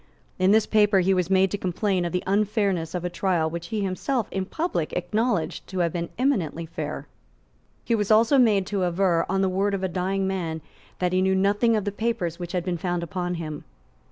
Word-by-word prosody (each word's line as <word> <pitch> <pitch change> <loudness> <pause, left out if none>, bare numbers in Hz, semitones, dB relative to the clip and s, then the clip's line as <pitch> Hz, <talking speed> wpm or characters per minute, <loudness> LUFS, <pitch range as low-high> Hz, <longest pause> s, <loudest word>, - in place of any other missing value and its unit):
In 185 +1 +4
this 215 +1 +5
paper 210 -3 +4
he 190 +2 +3
was 180 -1 0
made 190 0 +3
to 205 - -2
complain 185 0 0
of 170 - -2
the 180 - -1
unfairness 200 -4 0
of 180 0 -3
a - - 0
trial 175 -3 +1
which 170 0 -5
he 215 +3 -2
had - - 0
himself 220 +5 -1
in 190 -1 -2
public 255 - -2
acknowledged 200 +1 -1
to 190 - -6
have 170 -2 0
been 170 -1 -3
eminently 190 - 0
fair. 155 -3 -5 0.8
He 235 - 0
was 210 -3 0
also 225 +5 +5
made 210 -6 +4
to 195 -1 -1
aver, 175 -1 +1
on 195 +1 +1
the 190 - +2
word 195 +2 0
of 190 - -4
a - - +2
dying 190 +2 -1
man, 170 -4 -2 0.4
that 180 0 0
he 185 - +3
knew 190 0 +2
nothing 205 +4 +2
of 210 -2 -1
the 205 - -1
papers 205 -6 -2
which 175 0 -6
had 180 -1 -1
been 175 -2 -2
found 175 0 -2
upon 180 +1 -3
him. 155 -3 -6
190 Hz, 220 wpm, -25 LUFS, 175-205 Hz, 0.8 s, this